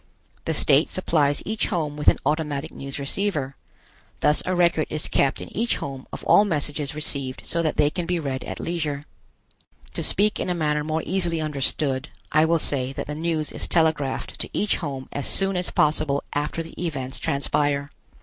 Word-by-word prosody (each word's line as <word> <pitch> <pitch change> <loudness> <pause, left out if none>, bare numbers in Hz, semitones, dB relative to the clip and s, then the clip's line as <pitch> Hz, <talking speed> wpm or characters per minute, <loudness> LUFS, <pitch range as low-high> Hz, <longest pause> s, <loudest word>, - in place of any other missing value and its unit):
The 160 - 0
state 145 +1 +5
supplies 150 -6 +1
each 220 +1 0
home 155 -7 -1
with 150 - -5
an - - +7
automatic 150 -3 -1
news 135 0 -6
receiver. 140 -2 -2 0.7
Thus 150 - +4
a 185 - +1
record 170 -3 +3
is 155 -1 -1
kept 135 - +2
in - - -9
each 230 +3 +1
home 135 -2 -6
of - - -7
all 205 - +6
messages 150 -5 -1
received 140 -3 -3
so 170 - 0
that 160 -2 -1
they 150 0 +4
can 175 0 -3
be 180 -1 0
read 135 -4 -3
at - - -6
leisure. 150 -4 -2 0.9
To - - -3
speak 210 +2 +2
in - - -2
a 180 - +1
manner 150 -2 0
more 155 +1 -1
easily 175 -3 +1
understood, 145 -1 0 0.2
I 155 +1 +5
will 165 +1 +3
say 135 -4 0
that - - -4
the 150 - -5
news 160 -1 -1
is - - -2
telegraphed 160 -5 0
to - - -4
each 210 - +1
home 135 -5 -5
as 145 - -1
soon 195 0 +3
as 180 0 +1
possible 150 -2 +2
after 150 +3 -1
the 165 - -8
events 135 -6 -3
transpire. 140 +1 0
150 Hz, 190 wpm, -24 LUFS, 140-170 Hz, 0.9 s, an